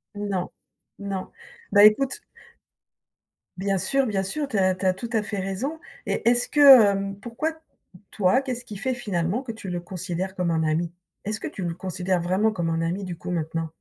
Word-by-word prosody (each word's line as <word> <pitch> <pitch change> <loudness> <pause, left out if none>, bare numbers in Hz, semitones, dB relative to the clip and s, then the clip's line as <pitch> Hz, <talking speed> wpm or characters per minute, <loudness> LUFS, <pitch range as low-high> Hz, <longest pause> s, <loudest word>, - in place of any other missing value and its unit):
Non, 200 -3 -2 0.5
non. 195 -2 -5 0.4
Bah 205 - +7
écoute 260 +6 +3 1.4
Bien 195 +1 0
sûr, 275 +8 +1
bien 200 -5 -1
sûr, 285 +9 -2
tu 215 - -2
as 185 -1 +3
tu 190 - -5
as 185 - +4
tout 230 +5 -7
à 225 -2 +2
fait 210 -1 -4
raison 220 +12 -3 0.3
et - - -2
est-ce 245 0 +2
que, 265 -9 +8 0.2
heu - - -10
pourquoi, 255 +8 -2 0.6
toi, 210 +6 +3
qu'est-ce 250 -2 -4
qui 215 -4 -8
fait 255 +6 -1
finalement 205 0 -2
que 235 - -5
tu 220 -4 -8
le 175 -1 -3
considères 185 +1 -4
comme 180 -2 0
un 160 -1 +1
ami? 160 +2 0 0.3
Est-ce 210 0 -2
que - - -3
tu 190 - -6
le 170 -1 -2
considères 180 0 -2
vraiment 190 +5 +1
comme 170 -4 -2
un 165 0 0
ami, 175 +4 -2
du 175 -3 -6
coup, 180 +1 -6
maintenant? 165 -1 -2
195 Hz, 195 wpm, -25 LUFS, 180-230 Hz, 1.4 s, que